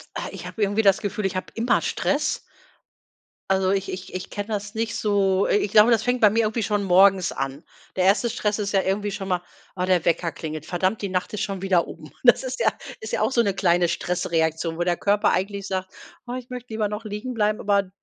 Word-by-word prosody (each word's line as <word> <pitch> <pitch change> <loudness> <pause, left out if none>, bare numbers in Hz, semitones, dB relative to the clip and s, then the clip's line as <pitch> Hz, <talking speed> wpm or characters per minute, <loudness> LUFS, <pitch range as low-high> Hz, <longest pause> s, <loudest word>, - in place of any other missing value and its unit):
Äh, - - -4
ich - - -8
habe 220 - -7
irgendwie 205 +1 +2
das 195 -3 +4
Gefühl, 205 -1 -3
ich 190 - -1
habe 185 - -3
immer 235 +1 +1
Stress. - - 0 1.1
Also, 190 -1 +2
ich 195 0 -1
ich 185 -1 -7
ich 185 0 -5
kenne 205 0 -5
das 210 -1 -3
nicht 225 0 -2
so 200 -2 +2
äh, - - +3
ich 205 -1 -1
glaube, 215 +2 +6
das 225 -2 +3
fängt 250 +1 0
bei 210 - +7
mir 225 +3 +2
irgendwie 220 +1 -1
schon 205 0 0
morgens 190 0 +5
an. 135 +3 -4 0.3
Der 185 - +1
1. 205 +5 +3
Stress 210 -1 -1
ist 205 -2 -2
ja 195 - +3
irgendwie 200 +2 -1
schon 195 0 -5
mal: 180 -2 0 0.3
„Ah, 180 -1 -1
der 185 -2 +2
Wecker 170 0 +1
klingelt. 155 -1 -6
Verdammt, 185 +5 -1
die 200 - -2
Nacht 185 +4 -2
ist 210 - -3
schon 195 -2 -3
wieder 190 -3 +2
um.“ - - -10
Das - - +6
ist - - -4
ja - - +5 0.3
ist 445 - -6
ja - - -1
auch - - +2
so 235 - +4
'ne 200 -4 +1
kleine 175 -2 +2
Stressreaktion, 165 -2 -1
wo 175 - 0
der 175 0 +1
Körper 205 +1 +2
eigentlich 200 +1 -2
sagt: 190 -1 -3 0.3
„Oh, 245 - -6
ich 255 -1 -7
möchte 250 -2 -7
lieber 215 -1 0
noch 210 +2 -5
liegen 215 +4 -5
bleiben.“ 215 -2 +1
Aber 200 -1 +2
d 190 - -18
200 Hz, 240 wpm, -24 LUFS, 185-215 Hz, 1.1 s, bei